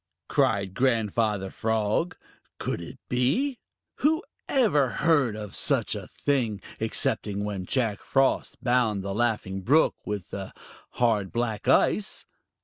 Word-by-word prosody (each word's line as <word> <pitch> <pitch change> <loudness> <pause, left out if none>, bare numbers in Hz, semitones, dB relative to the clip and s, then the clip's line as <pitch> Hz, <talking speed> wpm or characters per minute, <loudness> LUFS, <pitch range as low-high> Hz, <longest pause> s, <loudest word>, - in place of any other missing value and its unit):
cried 100 -2 +1
Grandfather 110 -4 +1
Frog. 110 +9 0 0.4
Could - - -3
it 85 - -9
be? 155 - +1 0.4
Who 315 +4 +2 0.3
ever 175 - +3
heard 145 -7 +2
of 105 -2 -7
such - - +1
a - - -6
thing, 120 -8 -1 0.2
excepting 100 -1 0
when 100 -3 -4
Jack 115 -6 0
Frost 135 -1 +1
bound 120 -6 +2
the 100 0 -3
Laughing 105 -4 -1
Brook 145 +11 +4
with 100 -2 -5 0.6
hard 110 -6 +1
black 115 -2 -2
ice? 200 +10 +2
115 Hz, 120 wpm, -27 LUFS, 105-135 Hz, 0.6 s, Brook